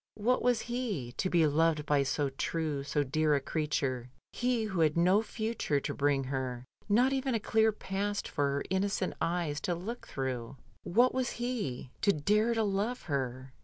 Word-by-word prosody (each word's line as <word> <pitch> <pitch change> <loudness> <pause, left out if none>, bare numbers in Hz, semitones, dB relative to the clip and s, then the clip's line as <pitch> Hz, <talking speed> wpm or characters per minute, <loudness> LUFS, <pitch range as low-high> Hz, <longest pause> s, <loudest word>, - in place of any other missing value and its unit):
What 240 +4 +2
was 245 -2 +2
he, 230 - -3
to 185 - 0
be 170 -3 +4
loved 155 0 +2
by 145 -2 +3
so 140 +1 0
true, 150 +1 -2
so 145 +1 0
dear 150 +2 +2
a - - +2
creature 135 -4 -2
— - - -63
he 245 -2 +1
who 195 -5 -2
had 155 -1 +3
no 185 +5 +5
future 220 -9 -1
to - - -3
bring 140 -1 +1
her, 130 -2 -3 0.2
not 245 +6 +4
even 265 -2 0
a - - +1
clear 220 +1 +3
past 205 0 -3
for 145 - 0
her 140 0 -1
innocent 190 0 0
eyes 165 -4 -1
to 175 - -1
look 215 +8 -6
through? 130 -1 -4 0.3
What 240 +7 +3
was 255 -1 -1
he, 225 - -3
to 205 - +5
dare 210 +8 +2
to 225 - +2
love 210 +5 -1
her? 130 -3 -3
170 Hz, 185 wpm, -31 LUFS, 140-220 Hz, 0.3 s, no